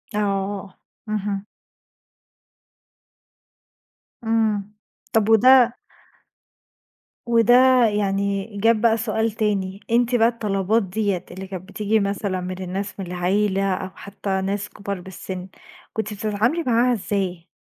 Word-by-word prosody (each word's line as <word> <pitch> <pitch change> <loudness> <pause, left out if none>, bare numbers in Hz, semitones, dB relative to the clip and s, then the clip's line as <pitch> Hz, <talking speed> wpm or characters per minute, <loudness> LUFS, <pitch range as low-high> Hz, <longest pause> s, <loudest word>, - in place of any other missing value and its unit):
آه 200 -1 -2 0.3
اهم. 205 -1 -2 2.8
إمم 215 -2 0 0.4
طَب 220 -1 +3
وده 245 +2 +6 1.5
وده 245 +2 +5
يعني 200 0 -1
جاب 225 +1 +3
بَقى 230 -1 +4
سؤال 220 0 0
تاني. 200 -3 -1
أنتِ 240 +1 +3
بَقى 230 -1 +5
الطلبات 215 -2 0
ديّة 195 -1 -2
اللي 190 +1 -7
كانت 185 0 -8
بتيجي 215 +2 +1
مثلًا 200 -2 -2
من 185 +1 -5
الناس 195 +3 -5
من 190 - -3
العيلة 190 +2 +1
أو 190 +1 -4
حتى 195 -1 -4
ناس 200 +2 -2
كبار 200 -2 -6
بالسن، 185 0 -7 0.5
كُنتِ 215 -1 -3
بتتعاملي 220 +9 0
معاها 245 -1 +3
إزاي؟ 185 -5 -2
205 Hz, 110 wpm, -22 LUFS, 195-225 Hz, 2.8 s, وده